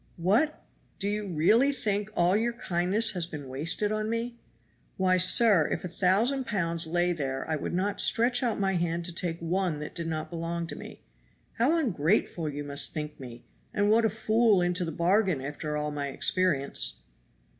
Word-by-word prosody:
"What! 220 - +1 0.3
do 200 - -2
you 210 0 -2
really 210 - +3
think 210 -6 -1
all 175 +2 +3
your 235 +3 0
kindness 210 -1 0
has 175 -4 -2
been 150 -5 -8
wasted 160 +10 0
on 215 0 -2
me? 235 +1 -3 0.6
Why, 185 -1 +3
sir, 185 -1 +5
if - - -2
a - - -2
thousand 215 +9 +1
pounds 170 -5 -1
lay 175 +2 +1
there 135 -4 -4
I 160 - 0
would 155 - -4
not 195 +2 -1
stretch 240 +2 +2
out 235 -5 -1
my 195 -1 +1
hand 170 0 -2
to 175 - -4
take 170 -1 -1
one 175 -1 -1
that 150 0 -7
did 170 -1 -4
not 155 0 -4
belong 170 0 -3
to - - -7
me. - - -11 0.6
How 285 +9 +3
ungrateful 175 - 0
you 145 0 -5
must 145 0 -1
think 150 -1 -5
me, 120 -3 -10 0.3
and 205 0 +2
what 230 +1 +4
a 220 - +3
fool 220 0 +2
into 180 +1 +1
the 165 - -3
bargain 185 0 +1
after 150 +2 -4
all 150 0 -2
my 145 -1 -3
experience!" 140 0 0
180 Hz, 185 wpm, -28 LUFS, 160-215 Hz, 0.6 s, sir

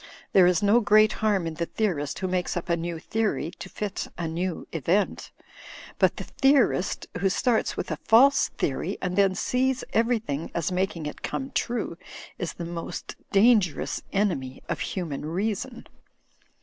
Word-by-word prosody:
There 185 -2 +7
is 180 +1 +2
no 205 +4 +5
great 215 -1 +5
harm 205 -5 +2
in 165 - -3
the 170 +1 -3
theorist 165 -10 -1
who 190 - -2
makes 180 -2 -1
up 175 - -5
a 170 - +3
new 170 0 -4
theory 210 -2 -1
to 190 - -7
fit 205 0 -4
a 170 - -2
new 170 +2 -3
event 170 +6 0 0.7
But - - +4
the - - -4
theorist 270 -9 +2
who 195 +1 +2
starts 225 +4 +1
with - - -3
a - - -2
false 265 +5 +5
theory 160 +8 -2
and 180 -1 -2
then 195 -1 +3
sees 260 +3 0
everything 225 - 0
as 170 +2 -1
making 180 -3 -1
it 150 - -6
come 270 0 -4
true 230 -8 -2 0.4
is 175 - -3
the 170 - -6
most 170 0 -6 0.2
dangerous 200 -5 +3
enemy 170 -11 -1
of 170 - -2
human 165 -8 -3
reason. 210 - -3
185 Hz, 160 wpm, -26 LUFS, 170-215 Hz, 0.7 s, There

